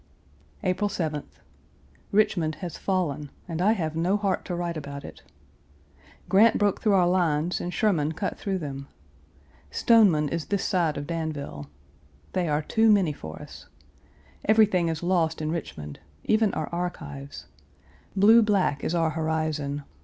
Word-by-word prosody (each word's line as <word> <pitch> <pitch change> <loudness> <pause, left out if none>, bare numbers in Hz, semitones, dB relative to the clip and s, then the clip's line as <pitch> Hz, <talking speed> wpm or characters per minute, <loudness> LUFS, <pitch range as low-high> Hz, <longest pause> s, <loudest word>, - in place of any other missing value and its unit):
April 185 +3 0
7th. 155 -7 -4 0.7
Richmond 175 -6 +2
has 175 -4 -6
fallen 150 -7 -2 0.2
and 165 -1 -3
I 210 +4 +4
have 160 -7 -3
no 175 +5 +1
heart 200 -3 -1
to 180 - -3
write 175 -1 -3
about 140 -2 -7
it. - - -11 1.1
Grant 215 +4 +5
broke 205 -2 +1
through 210 - +3
our 180 -2 +4
lines 175 -2 +1
and 175 - -3
Sherman 165 -5 +1
cut 195 +5 -3
through 195 -2 -2
them. 140 -4 -6 0.8
Stoneman 185 - +4
is 165 0 -3
this 200 -2 -1
side 170 -5 +1
of 145 - -4
Danville. 150 - -4 0.7
They 180 -3 0
are 150 +1 0
too 220 +6 +3
many 190 -7 +3
for 80 - -9
us. - - -12 0.8
Everything 210 -5 +4
is 165 0 -3
lost 170 -3 +1
in 155 0 -2
Richmond, 75 - -6 0.2
even 215 -1 +2
our 155 - -2
archives. 160 -5 -5 0.7
Blue 215 +4 +7
black 195 -9 +1
is 170 - -1
our 165 -2 +2
horizon. 155 -2 -2
170 Hz, 145 wpm, -26 LUFS, 150-195 Hz, 1.1 s, Blue